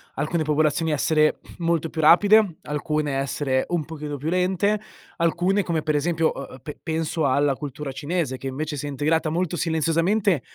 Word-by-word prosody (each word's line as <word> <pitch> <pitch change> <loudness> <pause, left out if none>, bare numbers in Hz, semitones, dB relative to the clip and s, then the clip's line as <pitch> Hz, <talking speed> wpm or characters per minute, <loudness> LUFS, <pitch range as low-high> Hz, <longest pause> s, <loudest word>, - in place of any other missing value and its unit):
alcune 155 +4 -1
popolazioni 155 +1 +1
essere 155 +1 +2 0.2
molto 165 -1 0
più 160 - -2
rapide, 200 +4 +6
alcune 150 0 -2
essere 135 -1 0
un 170 -4 -1
pochino 150 -2 -6
più 150 +4 -3
lente, 190 +4 +1 0.4
alcune 175 +4 +1
come 165 -4 -2
per 155 - 0
esempio 160 +2 +1
ehm, 135 -1 -8
pe 150 - -8
penso 160 -1 -1
alla 140 +2 +2
cultura 145 0 -6
cinese 145 0 -2
che 135 - -5
invece 150 +3 -3
si 145 +1 -4
è - - -3
integrata 155 +3 0
molto 175 +2 -1
silenziosamente, 165 - +1
155 Hz, 165 wpm, -24 LUFS, 145-170 Hz, 0.4 s, rapide